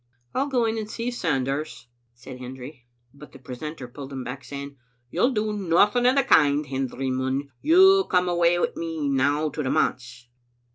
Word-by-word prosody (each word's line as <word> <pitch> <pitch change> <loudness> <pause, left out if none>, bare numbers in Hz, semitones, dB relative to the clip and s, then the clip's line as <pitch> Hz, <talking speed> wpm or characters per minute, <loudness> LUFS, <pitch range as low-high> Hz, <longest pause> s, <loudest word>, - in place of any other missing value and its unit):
"I'll 275 +2 0
go 250 -4 +1
in 225 0 -1
and 215 -1 -6
see 235 +2 -3
Sanders," 140 - -2 0.3
said 125 +1 -11
Hendry, 125 0 -10 0.3
but 145 +1 -14
the - - -11
precentor 130 +2 -7
pulled 135 +2 -10
him 135 -2 -5
back, 125 +2 -7
saying, 140 0 -8 0.2
" 120 0 -44
You'll 245 - +2
do 215 -4 -1
nothing 205 +5 +3
o' 255 - +4
the 275 - +4
kind, 150 - +4
Hendry 135 -1 -3
Munn; 130 +2 -2
you'll 380 +4 +6
come 180 -1 +1
awa 175 0 +2
wi' - - +3
me 160 -3 -3
now 145 +3 +1
to 150 - -5
the 130 - -2
manse." 125 -2 -1
145 Hz, 185 wpm, -24 LUFS, 130-205 Hz, 0.3 s, you'll